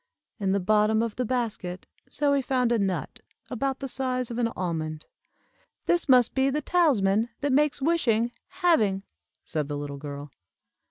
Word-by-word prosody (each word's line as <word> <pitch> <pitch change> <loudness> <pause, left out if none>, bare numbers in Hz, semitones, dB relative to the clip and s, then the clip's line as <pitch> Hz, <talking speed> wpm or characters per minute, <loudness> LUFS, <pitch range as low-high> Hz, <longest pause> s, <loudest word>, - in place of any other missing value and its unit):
In 195 -2 0
the 200 - +2
bottom 215 +3 +3
of 230 -2 -3
the 250 - -1
basket 215 -7 -3 0.2
Zoie 280 -1 +1
found 250 -2 +1
a 235 - +2
nut, 190 +1 -2 0.3
about 265 +2 -1
the 270 - -3
size 255 -2 -2
of 235 - -3
an 235 - +2
almond. 155 -4 -3 0.8
"This 345 -4 +2
must 250 -3 +5
be 265 0 +2
the 290 +2 0
talisman 235 - +2
that 285 -2 +1
makes 285 -1 +2
wishing 240 -8 +2 0.2
'having,'" 215 - +2 0.4
said 155 -3 -2
the 145 0 -3
little 145 -1 -5
girl. 145 0 -7
230 Hz, 160 wpm, -26 LUFS, 190-270 Hz, 0.8 s, must